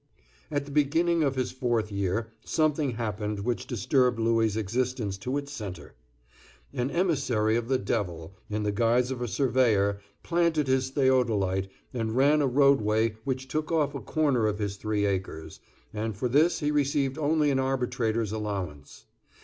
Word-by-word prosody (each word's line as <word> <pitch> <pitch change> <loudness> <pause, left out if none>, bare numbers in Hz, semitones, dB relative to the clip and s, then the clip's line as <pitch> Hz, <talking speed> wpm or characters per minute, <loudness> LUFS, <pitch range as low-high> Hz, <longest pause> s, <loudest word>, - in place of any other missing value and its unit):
At 145 -1 -2
the 145 - -10
beginning 160 +4 +2
of 140 -3 +1
his 130 -1 -1
fourth 120 -5 -1
year 100 +3 -2
something 155 -2 +1
happened 105 -2 -3
which 120 +3 -2
disturbed 125 +1 +1
Louis' 115 -2 +2
existence 110 0 -1
to 125 +7 -2
its 140 0 -5
centre. 100 -10 -7 0.8
An 125 +2 -1
emissary 135 - +1
of 115 0 -1
the 130 0 +2
devil, 95 -6 -3 0.2
in 105 0 -2
the 105 - 0
guise 120 +4 +2
of 125 -2 -4
a 120 - -1
surveyor, 110 -4 +2 0.2
planted 170 -3 +1
his 130 0 +1
theodolite, 115 -9 +1 0.2
and 115 -2 -2
ran 145 +3 +4
a 140 - +2
roadway 115 -5 +3
which 130 -1 -2
took 155 +4 -3
off 150 -3 +1
a 140 - -5
corner 140 -8 +1
of 105 -1 -1
his 100 -2 -3
three 105 0 -1
acres, 90 -5 -3 0.3
and 110 -1 -3
for 125 - 0
this 150 +9 +3
he 145 0 +1
received 140 -1 0
only 150 -1 +2
an 135 - +1
arbitrator's 125 -5 -1
allowance. 95 -10 -5
120 Hz, 160 wpm, -27 LUFS, 105-140 Hz, 0.8 s, ran